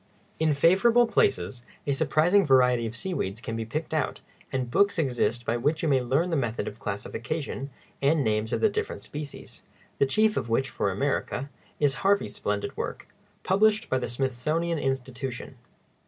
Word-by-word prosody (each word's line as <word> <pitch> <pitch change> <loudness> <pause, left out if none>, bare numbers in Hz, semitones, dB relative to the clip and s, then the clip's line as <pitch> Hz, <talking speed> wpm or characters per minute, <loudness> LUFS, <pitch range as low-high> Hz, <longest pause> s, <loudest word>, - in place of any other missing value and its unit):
] - - -34
In 155 -2 +3
favorable 195 +11 +5
places 120 - +1 0.2
a 140 - +1
surprising 160 +7 +3
variety 125 -5 +4
of 110 - -7
seaweeds 125 - -3
can 115 -1 -5
be 115 0 -3
picked 155 +8 -4
out, 155 -4 -1 0.3
and 130 -2 -2
books 200 +8 +3
exist 120 -6 0
by 120 - 0
which 150 +7 0
you - - +2
may 135 -3 +3
learn 140 +9 +1
the - - +1
method 120 -6 -1
of 105 - -7
classification 135 +7 -4 0.3
and 145 +1 +3
names 110 0 0
of - - -1
the 220 - +5
different 200 - -3
species, 145 -1 -8 0.4
the 140 - +4
chief 215 +9 +2
of 115 - -2
which, 130 +4 +1
for 100 - 0
America, 140 +4 -2 0.3
is 145 -2 +3
Harvey's 195 - +2
splendid 105 0 -2
work, - - -5 0.3
published 215 +3 +2
by 130 - +2
the - - -3
Smithsonian 140 +7 -1
Institution. 130 -2 -4
135 Hz, 170 wpm, -27 LUFS, 120-165 Hz, 0.4 s, favorable